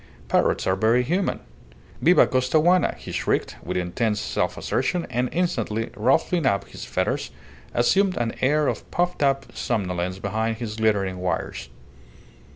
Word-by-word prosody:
Parrots - - +2
are 95 - +2
very 115 +5 +3
human. 180 +9 -1 0.6
"Viva 175 +3 +6
Costaguana!" 155 +7 +2
he - - -9
shrieked, - - -1
with 90 +1 -3
intense 105 +4 -1
self - - -1
assertion, 175 -1 -1
and, 125 +1 0
instantly 115 - -1
ruffling 135 +7 +2
up 100 -3 +1
his - - -9
feathers, - - -1 0.5
assumed 190 +11 +3
an 120 -1 -1
air 150 +3 +3
of - - -3
puffed 175 -1 -1
up 135 -1 +2
somnolence 90 -5 -2
behind 110 +3 -2
the 120 - -4
glittering 100 -4 +1
wires. 90 -2 -3
120 Hz, 140 wpm, -24 LUFS, 100-150 Hz, 0.6 s, Viva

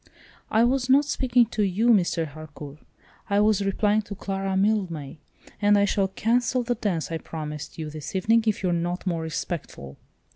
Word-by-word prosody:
"I 220 +1 +3
was 255 +1 +1
not 280 +3 +5
speaking 250 -4 +2
to 215 - -1
you, 205 +4 +2
Mr. 175 -6 +3
Harcourt. 150 -1 -10 0.5
I 200 0 +3
was 210 -1 +3
replying 205 +2 +1
to 205 -1 -8
Clara 195 0 -2
Mildmay, 185 -8 -1 0.4
and 205 0 +5
I 200 - +4
shall 195 -1 +1
cancel 240 +5 0
that 245 0 -3
dance 170 -6 -1
I 165 - -2
promised 150 -2 -7
you 155 -2 -5
this 155 +3 -7
evening 225 +4 +3
if 210 -2 0
you're 180 -2 +1
not 175 +2 -2
more 170 -3 -1
respectful." 160 - -5
195 Hz, 175 wpm, -25 LUFS, 165-220 Hz, 0.5 s, not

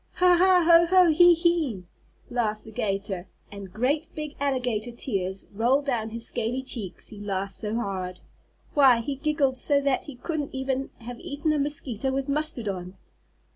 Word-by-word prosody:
"Ha! 360 0 +5
Ha! 365 -2 +5
Ho! 340 0 +7
Ho! 365 -1 +6
He! 350 +2 +7
He!" 325 - 0 0.5
laughed 215 -3 -1
the 220 - -12
'gator, 195 -3 -3 0.2
and 200 -2 -9
great 275 - 0
big 305 -1 -5
alligator 250 -5 -1
tears 195 -6 -3
rolled 250 +7 +2
down 235 -5 -1
his 230 +1 -5
scaly 245 +2 -2
cheeks, 220 -8 -4
he 210 - -11
laughed 195 -1 -3
so 215 0 -3
hard. 190 -5 -3 0.5
Why, 265 -5 +6
he 280 +5 -3
giggled 280 -2 0
so 285 -2 +2
that 275 -2 0
he 285 - -9
couldn't 295 +1 -4
even 265 0 -2
have 240 +1 -8
eaten 305 -2 -2
a 300 - 0
mosquito 270 -4 -1
with 270 +1 -2
mustard 290 -5 -2
on. 185 -1 -5
255 Hz, 170 wpm, -26 LUFS, 215-295 Hz, 0.5 s, Ho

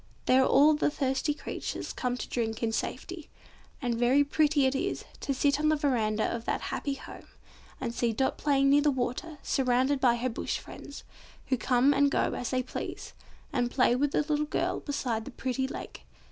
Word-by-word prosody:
There 260 +1 +5
all 285 +4 +5
the 300 - +1
thirsty 280 +1 -1
creatures - - -5
come 250 -1 -2
to - - -5
drink 225 -1 -2
in 225 - +1
safety. 305 +8 -4 0.5
And 240 -1 +1
very 245 +5 +4
pretty 295 -1 +2
it 265 - +2
is, 275 - -2
to - - -3
sit 280 +1 +2
on 305 0 +2
the 310 - +4
verandah 225 -7 +1
of 230 0 -7
that - - 0
happy 280 -1 -2
home, - - -11 0.5
and 240 -3 -3
see 235 -1 0
Dot 265 +4 0
playing 275 -2 +2
near 290 +1 +6
the 295 - +3
water 265 +4 -2
surrounded 260 +1 +2
by 240 -2 +4
her 240 +2 -1
Bush 230 - -3
friends, 285 - -10 0.5
who 260 - +3
come 255 +3 +3
and 285 0 +4
go - - +1
as 245 - -3
they 255 -1 0
please, 255 - -6 0.4
and 245 -3 +1
play 245 -1 +3
with 285 +3 +1
the - - +2
little 300 0 0
girl - - -1
beside 250 -6 -2
the - - -8
pretty 260 0 -2
lake. - - -8
265 Hz, 195 wpm, -29 LUFS, 245-285 Hz, 0.5 s, near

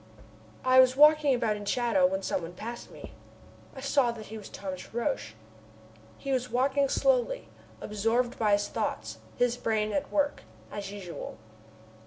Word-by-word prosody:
I 255 0 +6
was 255 0 +6
walking 300 -1 +6
about 225 -3 0
in 205 - -7
the 205 - -3
shadow, 235 -7 +3
when 190 +1 -2
some - - -1
one 165 +1 -7
passed 235 +5 -7
me. - - -11 0.6
I 265 - -8
saw 275 -3 +2
that 220 -2 -9
he 220 +2 -8
was 205 - -10
Thomas 190 -2 -7
Roch. 160 - -2 0.8
He 275 - -5
was 250 -1 0
walking 275 +2 +2
slowly, - - +1 0.3
absorbed 225 +4 0
by 210 -2 +3
his 205 0 +2
thoughts, 110 - -3 0.2
his 245 0 +2
brain 215 -2 0
at 290 -1 -2
work, 290 -1 +1 0.3
as 200 -1 -5
usual. 185 - -7
235 Hz, 165 wpm, -29 LUFS, 205-265 Hz, 0.8 s, I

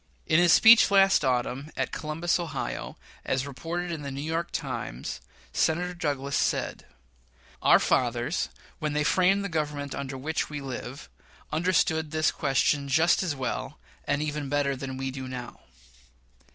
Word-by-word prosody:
In 155 - +4
his 175 -1 +5
speech 230 +4 +8
last 195 -4 +5
autumn 130 +2 -1
at - - -1
Columbus, 160 +3 -1
Ohio, 155 - -4 0.3
as 130 +1 -1
reported 170 +5 -4
in 160 -3 -4
the 140 - -5
New 140 +1 -5
York 165 +2 -2
Times, - - -5 0.3
Senator 180 +3 +1
Douglas 140 -4 -2
said: - - -1 0.7
"Our - - +7
fathers, 120 +5 0 0.3
when 150 -2 -2
they 150 0 +1
framed 190 +5 +3
the - - 0
Government 150 -4 -3
under 135 -1 -5
which 155 +5 -2
we 150 -1 -5
live, 135 0 -7 0.4
understood 160 -1 +1
this 155 0 +1
question 140 0 +1
just 160 +5 +3
as 175 -6 -1
well, 130 -3 -4 0.3
and 145 +1 0
even 150 -2 -3
better 145 -1 +1
than 130 0 -6
we 135 0 -3
do 130 0 -6
now." 125 -1 -7
150 Hz, 150 wpm, -27 LUFS, 135-165 Hz, 0.7 s, speech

